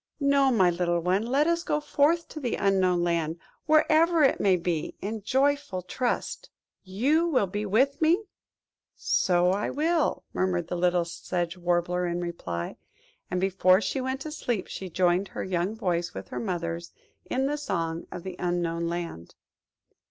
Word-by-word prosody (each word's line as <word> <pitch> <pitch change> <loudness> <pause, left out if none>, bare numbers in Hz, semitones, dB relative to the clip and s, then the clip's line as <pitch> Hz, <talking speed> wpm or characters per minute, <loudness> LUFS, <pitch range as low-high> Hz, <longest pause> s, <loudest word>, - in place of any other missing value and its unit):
No, 280 -1 +3
my 190 -7 +4
little 175 0 0
one, 185 +6 0
let 275 +4 +2
us 335 +1 +1
go 300 - 0
forth 300 +3 +2
to 310 - -7
the 250 -5 -1
Unknown 185 -3 +2
Land, 165 -1 0 0.3
wherever 315 +1 +4
it 270 - +3
may 195 -2 +4
be, 170 -3 -2
in 215 +2 -4
joyful 275 -4 0
trust." 250 - -3 0.3
"You 270 - +1
will 265 -11 +2
be 205 +3 -4
with 265 +9 +2
me;–so 310 - 0
I 200 +2 -1
will," 320 +1 0
murmured 180 -2 -1
little 175 0 +2
Sedge 175 0 -3
Warbler 175 0 0
in 175 0 -2
reply; 90 - -4 0.5
and 180 - -1
before 185 0 +4
she 220 +6 -2
went 260 +1 -3
to 310 - -5
sleep 240 -9 -2
she 190 - -7
joined 180 +2 +2
her - - -5
young 185 +3 -1
voice 175 -5 -2
with - - -7
her - - -4
mother's 170 -4 -3 0.3
in 265 +1 -1
the 290 +2 0
song 165 - -3
of 175 - -7
the 185 -1 -6
Unknown 170 -1 -1
Land. 170 - -5
185 Hz, 160 wpm, -27 LUFS, 175-270 Hz, 0.5 s, my